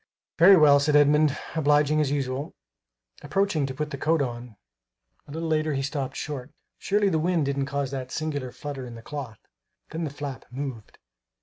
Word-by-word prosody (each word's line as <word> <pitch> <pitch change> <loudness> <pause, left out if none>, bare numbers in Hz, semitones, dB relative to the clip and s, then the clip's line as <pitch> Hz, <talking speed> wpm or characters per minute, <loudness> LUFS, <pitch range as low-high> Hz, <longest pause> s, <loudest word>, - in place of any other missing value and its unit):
"Very 190 +3 +9
well," 145 -3 +7
said 145 +1 +1
Edmund, 145 0 +4 0.2
obliging 150 0 +3
as 145 - +1
usual. 140 +1 -2 0.7
Approaching 155 -1 0
to 130 - -5
put 150 +2 -3
the 140 - -5
coat 160 +3 +2
on, 120 -4 -4 0.7
a - - -11
little 165 +2 -3
later, 155 -1 +1
he 135 - -1
stopped 140 -2 -3
short. 145 -3 -5 0.3
Surely 205 0 +1
the 160 -4 +1
wind 170 -2 +1
didn't 140 0 -1
cause 140 -1 -2
that 130 -2 -5
singular 145 -5 -3
flutter 135 -2 -6
in 120 - -9
the 115 - -11
cloth! 135 -7 -6 0.5
Then 165 +1 -3
the 155 - -2
flap 140 -3 -7
moved. 130 -4 -6
145 Hz, 180 wpm, -26 LUFS, 135-155 Hz, 0.7 s, Very